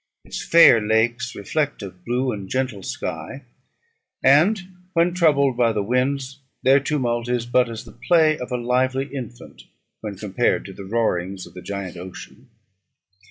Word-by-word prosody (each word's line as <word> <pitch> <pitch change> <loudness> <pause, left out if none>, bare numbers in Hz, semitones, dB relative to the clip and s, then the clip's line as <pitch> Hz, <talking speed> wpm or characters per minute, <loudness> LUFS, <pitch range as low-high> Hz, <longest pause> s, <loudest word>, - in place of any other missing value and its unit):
Its - - -6
fair 165 -9 +7
lakes 115 +3 0
reflect 145 +5 -2
a 95 - -6
blue 120 +8 -2
and 100 -4 -6
gentle 130 -5 -2
sky; 135 +7 -5 0.8
and, 160 +11 +5 0.3
when 170 +1 +2
troubled 145 -7 +3
by 120 -1 +3
the 105 -2 -1
winds, 130 +4 -1 0.2
their 135 +2 +6
tumult 120 -5 -1
is 120 -1 0
but 125 0 +2
as 115 +2 -7
the - - -12 0.2
play 160 -3 +5
of 125 - -6
a 125 - 0
lively 130 +2 0
infant, 120 -3 -9 0.3
when 105 -2 -6
compared 105 +4 0
to 95 - -9
the 100 - -9
roarings 95 -4 -1
of - - -15
the 90 - -9
giant 100 -3 -6
ocean. 90 +1 -11
120 Hz, 160 wpm, -22 LUFS, 105-135 Hz, 0.8 s, fair